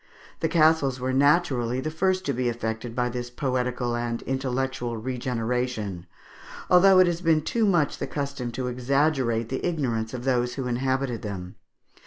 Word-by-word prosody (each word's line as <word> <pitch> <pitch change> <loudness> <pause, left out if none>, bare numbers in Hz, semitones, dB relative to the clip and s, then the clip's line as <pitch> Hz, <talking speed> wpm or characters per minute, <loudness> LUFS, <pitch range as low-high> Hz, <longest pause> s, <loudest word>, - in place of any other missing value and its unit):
The 160 - 0
castles 155 -5 +3
were 130 +1 -1
naturally 135 -4 +2
the 155 +4 -3
first 185 +3 0
to 140 - 0
be 125 0 0
affected 115 0 -4
by 125 0 +1
this 120 0 -4
poetical 125 -1 -1
and 120 0 -3
intellectual 130 -2 -2
regeneration, 120 -5 -3 0.6
although 185 +1 +7
it 185 - +7
has 175 -1 -1
been 165 -3 +3
too 225 +5 +1
much 170 -7 +1
the - - -3
custom 140 -4 -4
to 130 - -3
exaggerate 125 -2 +1
the 130 - -3
ignorance 130 -9 -1
of 120 - -6
those 125 -2 0
who 135 - -3
inhabited 130 -1 -1
them. 95 -3 -6
130 Hz, 160 wpm, -25 LUFS, 120-145 Hz, 0.6 s, although